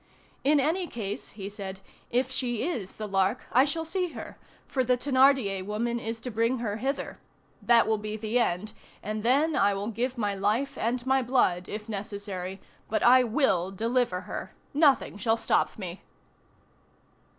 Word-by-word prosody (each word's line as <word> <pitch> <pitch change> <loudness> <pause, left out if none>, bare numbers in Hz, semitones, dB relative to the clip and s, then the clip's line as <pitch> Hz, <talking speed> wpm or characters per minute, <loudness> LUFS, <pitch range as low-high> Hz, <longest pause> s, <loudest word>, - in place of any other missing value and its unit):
"In 290 +1 +4
any 335 +6 +1
case," 210 -7 -4
he 195 -2 -5
said, 195 -2 -6 0.3
"if 255 +2 0
she 240 -3 -1
is 220 - -4
the 215 - -6
Lark, 195 +4 +1
I 255 +3 +5
shall 325 +3 -2
see 360 +1 -2
her, - - -8 0.3
for 260 - 0
the 250 0 +2
Thénardier 260 -7 +3
woman 235 +4 -2
is 225 0 -4
to 250 - -5
bring 230 +3 +1
her 215 -3 -2
hither. 270 +5 -3 0.4
That 235 -1 +5
will 220 -1 +1
be 215 0 -4
the 220 +3 0
end, 210 -1 0 0.3
and 215 +1 -3
then 285 +7 +3
I 200 0 +3
will 200 +2 -3
give 245 +3 -2
my 205 -3 0
life 215 +8 0
and 240 +2 -1
my 265 0 +3
blood 235 -8 +1
if 210 +1 -5
necessary, 200 -3 -5 0.3
but 215 - 0
I 255 +1 +7
will 220 - +1
deliver 225 -1 0
her! - - -7 0.2
Nothing 285 -7 +3
shall 225 +3 +1
stop - - +1
me." 185 -3 -6
230 Hz, 170 wpm, -28 LUFS, 205-260 Hz, 0.4 s, I